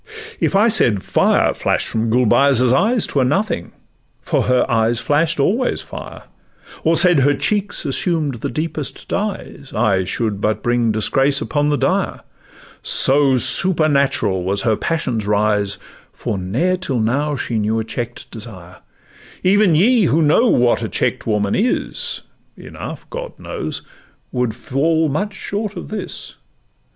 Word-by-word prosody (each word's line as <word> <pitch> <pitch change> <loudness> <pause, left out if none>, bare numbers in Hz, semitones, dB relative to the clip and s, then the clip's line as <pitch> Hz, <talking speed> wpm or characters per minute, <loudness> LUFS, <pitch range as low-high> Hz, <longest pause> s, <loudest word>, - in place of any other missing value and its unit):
If - - 0
I 210 +4 +4
said 120 - +3
fire - - +2
flash'd - - -1
from 115 0 -1
Gulbeyaz' 125 +2 +3
eyes, 220 - +2
'Twere 135 - 0
nothing—for 145 - -3
her 125 0 +2
eyes 115 -1 +1
flash'd 155 +4 0
always 230 - +1
fire; - - -10 0.6
Or 165 +1 +3
said 175 -3 +4
her 145 +2 +3
cheeks 205 +5 -1
assumed 145 -4 0
the - - -2
deepest 155 -2 -4
dyes, 200 -9 -5
I 105 -4 +2
should 105 +1 -2
but 110 0 -1
bring 120 -1 +1
disgrace 135 +6 +2
upon 145 0 -1
the 145 - +1
dyer, - - -1 0.6
So 135 -1 +3
supernatural 140 - +3
was 100 +2 0
her 110 -2 +2
passion's 125 -10 -2
rise; 105 -1 +1 0.3
For - - -4
ne'er 130 - 0
till 140 -9 -2
now 140 +7 0
she 120 -4 -2
knew 110 +1 0
a 110 - -1
check'd 120 +1 -6
desire: 95 -6 -10 0.7
Even 195 -2 +4
ye 220 +5 +4
who 160 +1 +2
know 155 +12 +3
what 120 - +2
a - - -2
check'd - - -2
woman 105 -2 0
is 255 - -2 0.3
(Enough, - - -9
God - - -7
knows!) - - -6 0.5
would 125 -2 0
much 110 - -8
fall 155 - 0
short 205 +1 -5
of - - -8
this. 210 -3 -7
135 Hz, 140 wpm, -18 LUFS, 110-170 Hz, 0.7 s, I